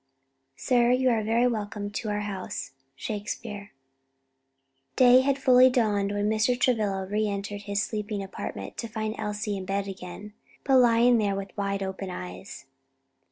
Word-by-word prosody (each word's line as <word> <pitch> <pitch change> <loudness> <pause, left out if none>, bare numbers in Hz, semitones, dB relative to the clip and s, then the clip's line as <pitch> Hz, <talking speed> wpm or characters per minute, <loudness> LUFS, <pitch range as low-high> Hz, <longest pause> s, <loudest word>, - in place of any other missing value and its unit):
"Sir, 240 - +2
you 255 0 +3
are 225 -2 +1
very 230 +3 +2
welcome 210 -3 -2
to 215 +1 -4
our 210 0 -1
house." 200 -3 -5 0.2
SHAKESPEARE 205 - -6 1.2
Day 250 0 +7
had 275 0 +1
fully 255 -1 +6
dawned 210 -5 +1
when 205 0 -1
Mr. 220 +3 +1
Travilla 210 -7 +1
re 210 +2 0
entered 200 0 -4
his 200 0 +1
sleeping 210 -2 -3
apartment 195 - -7
to 230 - -4
find 215 0 -3
Elsie 210 -1 -3
in 190 - -5
bed 195 +1 -2
again, 195 +2 -8 0.3
but 270 -1 +4
lying 240 -1 +5
there 200 -2 0
with 195 0 -6
wide 200 -1 -2
open 190 0 -5
eyes. 90 - -8
210 Hz, 155 wpm, -27 LUFS, 200-235 Hz, 1.2 s, Day